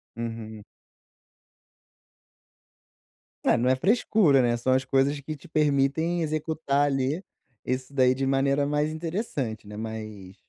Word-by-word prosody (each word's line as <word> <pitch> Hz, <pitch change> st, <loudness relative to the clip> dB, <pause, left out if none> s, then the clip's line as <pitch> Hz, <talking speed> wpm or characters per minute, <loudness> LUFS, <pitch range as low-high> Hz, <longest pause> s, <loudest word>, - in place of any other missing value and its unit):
Uhum. 115 Hz, -2 st, -6 dB, 2.8 s
É, -, -, +3 dB
não 125 Hz, +2 st, +1 dB
é -, -, +3 dB
frescura, 190 Hz, -, +3 dB
né, 120 Hz, -1 st, +2 dB
são 125 Hz, +2 st, 0 dB
as 130 Hz, 0 st, +2 dB
coisas 135 Hz, +2 st, +1 dB
que 155 Hz, +2 st, -6 dB
te 140 Hz, -, -15 dB
permitem 155 Hz, +3 st, +1 dB
executar, 155 Hz, -2 st, 0 dB
ali, 140 Hz, +6 st, -1 dB, 0.4 s
isso 130 Hz, +1 st, -3 dB
daí 130 Hz, -2 st, +4 dB
de 135 Hz, +1 st, -2 dB
maneira 140 Hz, +1 st, +2 dB
mais 150 Hz, +1 st, 0 dB
interessante, 155 Hz, -, -4 dB
né. 105 Hz, -, -9 dB
Mas 110 Hz, -3 st, -7 dB
135 Hz, 125 wpm, -26 LUFS, 120-155 Hz, 2.8 s, daí